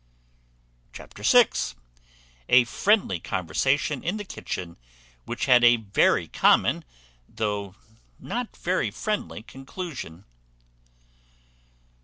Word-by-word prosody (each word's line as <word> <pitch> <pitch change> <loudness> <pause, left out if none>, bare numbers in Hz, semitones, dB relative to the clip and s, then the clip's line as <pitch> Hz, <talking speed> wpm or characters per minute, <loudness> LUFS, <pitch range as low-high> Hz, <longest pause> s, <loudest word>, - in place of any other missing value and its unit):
Chapter - - -12
vi. - - +6 1.0
A 125 0 +7
friendly 190 - +1
conversation 130 - -1
in 180 +5 -2
the 210 - -5
kitchen, 85 - -6 0.5
which - - -3
had 125 -1 +5
a 120 0 +7
very 105 -4 +1
common, - - +3 0.5
though 105 -3 -3 0.4
not 245 -1 -5
very 185 +1 -1
friendly, 210 - -4
conclusion. 135 - -8
125 Hz, 90 wpm, -25 LUFS, -, 1.0 s, A